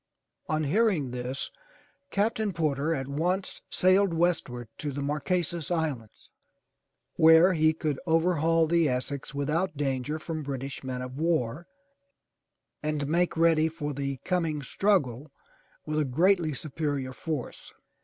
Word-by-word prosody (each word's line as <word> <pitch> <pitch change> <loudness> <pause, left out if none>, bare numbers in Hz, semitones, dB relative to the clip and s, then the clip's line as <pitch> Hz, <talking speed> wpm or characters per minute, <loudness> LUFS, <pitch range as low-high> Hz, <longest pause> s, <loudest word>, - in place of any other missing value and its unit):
On 155 0 +1
hearing 165 - +2
this. 125 +2 -4 0.6
Captain 215 -1 0
Porter 155 -2 0
at 135 -5 -2
once 175 +7 -1
sailed 185 -1 +3
westward 160 -8 0
to 145 - -3
the 140 +1 -4
Mar 145 +2 -1
que'sas 170 0 -1
Islands 150 -10 -3 0.9
where 160 +3 +7
he 155 -1 +4
could 155 -3 -2
overhaul 165 0 +3
the 165 -1 +3
Essex 130 +2 -3
without 150 +3 -1
danger 140 +1 -1
from 160 0 -5
British 135 -1 -5
men 130 -1 -4
of 130 +2 -7
war 160 -2 0 1.1
and 150 -2 -1
make 170 +2 +1
ready 165 -1 +4
for 155 -2 -4
the 140 -1 -3
coming 165 -5 0
struggle 145 - 0 0.5
with 155 0 -1
a 150 - +2
greatly 165 +3 +2
superior 145 -3 -3
force. 150 -3 -5
155 Hz, 130 wpm, -28 LUFS, 140-170 Hz, 1.1 s, where